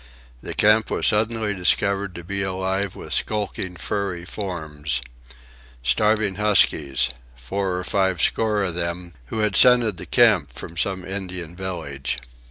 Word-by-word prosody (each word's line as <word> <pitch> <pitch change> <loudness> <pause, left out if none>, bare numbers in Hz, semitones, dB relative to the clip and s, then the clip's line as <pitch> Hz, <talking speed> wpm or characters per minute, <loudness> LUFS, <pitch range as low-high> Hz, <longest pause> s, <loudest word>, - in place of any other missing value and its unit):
The - - -5
camp 105 +1 +4
was - - +1
suddenly 110 0 +2
discovered 100 +1 +1
to 85 - -8
be 100 +3 -2
alive 95 0 -2
with - - -5
skulking 100 -3 -2
furry 90 -1 -3
forms,—starving 70 - -3
huskies, 70 -12 +3 0.2
four 90 +10 -3
or 90 - -3
five 95 -3 0
score 105 +3 +2
of 90 -3 -1
them, 85 0 -4
who 110 - -3
had 105 -2 0
scented 120 -5 +5
the - - -8
camp - - +4
from 85 - -8
some 95 +2 -1
Indian 90 -3 -5
village. 80 -8 -4
95 Hz, 135 wpm, -23 LUFS, 80-100 Hz, 0.2 s, scented